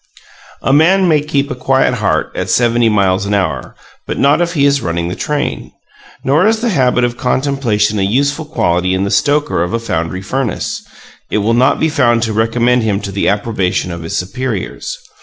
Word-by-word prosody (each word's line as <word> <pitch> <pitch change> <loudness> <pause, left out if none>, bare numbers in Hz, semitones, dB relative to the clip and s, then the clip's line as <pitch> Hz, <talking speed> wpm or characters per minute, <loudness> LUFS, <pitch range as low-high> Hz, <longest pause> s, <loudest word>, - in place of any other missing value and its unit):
A 135 - +2
man 180 +6 +4
may 155 -3 +3
keep 140 -1 -1
a - - -3
quiet 130 0 +1
heart 105 -5 0
at 90 - -4
seventy 120 +3 +3
miles 100 -1 +1
an 105 - 0
hour, 100 -2 -2 0.3
but - - -3
not 140 +4 +3
if 170 0 -1
he 140 -2 +3
is 140 -1 +2
running 85 0 -2
the 90 - -4
train. 150 -1 -3 0.5
Nor 150 +9 +3
is 220 0 +2
the 240 - 0
habit 125 - +2
of 120 0 -1
contemplation 125 -6 0
a - - +1
useful 140 +9 0
quality 90 - 0
in 95 - 0
the 100 - -2
stoker 145 - +1
of 90 +1 -2
a 115 - 0
foundry 95 -4 -3
furnace; 125 +2 -3 0.5
it - - 0
will 115 - +2
not 125 +3 +3
be 160 - +2
found 120 -7 +2
to 110 -2 -1
recommend 120 +3 +2
him 105 -3 0
to 100 -1 -6
the 100 0 0
approbation 100 -4 -1
of 85 0 -6
his 80 - -4
superiors. 105 +3 -4
120 Hz, 195 wpm, -15 LUFS, 100-140 Hz, 0.5 s, man